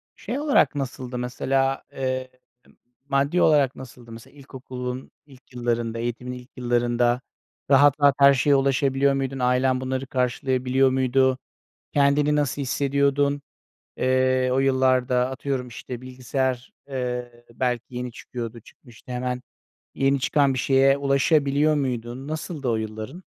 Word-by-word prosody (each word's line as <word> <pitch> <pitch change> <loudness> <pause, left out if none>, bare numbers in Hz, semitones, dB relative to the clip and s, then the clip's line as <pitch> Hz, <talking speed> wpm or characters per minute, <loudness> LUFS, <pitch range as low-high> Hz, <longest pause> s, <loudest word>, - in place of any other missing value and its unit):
şey 260 - -4
olarak 290 - +3
nasıldı 130 -2 -4
mesela, 135 +2 -1
eee, 130 -1 -3 0.8
maddi 140 +6 +2
olarak 145 -4 +4
nasıldı? 120 -2 -12
Mesela 115 0 -12
ilkokulun 130 -1 -7
ilk 135 -3 -19
yıllarında, 120 -1 -2
eğitimin 120 +1 -4
ilk 125 0 -11
yıllarında 120 0 +1 0.5
rahat 145 +1 +6
rahat 140 -1 +5
her 140 0 +8
şeye 140 +2 +3
ulaşabiliyor 135 0 +2
muydun? 135 0 -2
Ailen 130 +1 +2
bunları 130 +1 -3
karşılayabiliyor 130 +1 +1
muydu? 130 0 +2 0.6
Kendini 145 +1 +3
nasıl 145 -1 -1
hissediyordun? 140 +1 +1 0.6
Eee, 130 0 +2
o 130 - +2
yıllarda 130 -2 +2
atıyorum, 130 -1 -3
işte, 120 +1 -8
bilgisayar, 130 0 -3 0.2
eee, 125 -2 -4
belki 125 0 -2
yeni 125 0 -4
çıkıyordu, 115 -1 -7
çıkmıştı. 120 +1 -15
Hemen 125 0 -3 0.5
yeni 135 0 +2
çıkan 140 +1 +2
bir 130 - -2
şeye 135 +1 +4
ulaşabiliyor 140 +2 +2
muydun? 125 -1 -3
Nasıldı 155 -3 -4
o 115 - +1
yılların? 110 - -6
130 Hz, 125 wpm, -24 LUFS, 125-140 Hz, 0.8 s, her